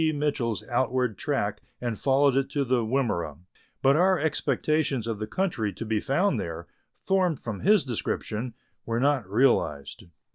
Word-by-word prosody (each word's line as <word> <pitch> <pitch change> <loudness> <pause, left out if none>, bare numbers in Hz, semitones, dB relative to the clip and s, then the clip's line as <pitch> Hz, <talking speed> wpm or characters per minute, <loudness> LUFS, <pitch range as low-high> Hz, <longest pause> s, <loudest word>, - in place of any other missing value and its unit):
Mitchell's 145 -6 -1
outward 125 -2 0
track - - -2 0.2
and 120 -3 -3
followed 135 0 +3
it 135 0 +1
to 140 -1 -1
the 125 -1 +1
Wimmera, 110 - -1 0.5
but 135 +1 +5
our 185 +3 +4
expectations 150 -3 0
of 115 -3 -3
the 110 - -3
country 115 - -1
to 115 - -6
be 110 -1 0
found 170 - +1
there, 85 0 -5 0.4
formed 185 -6 +1
from 110 -4 -5
his 205 -4 +4
description, 115 -1 -3 0.3
were 115 0 -1
not 135 -6 +1
realized. 105 - +1
130 Hz, 150 wpm, -27 LUFS, 110-145 Hz, 0.5 s, but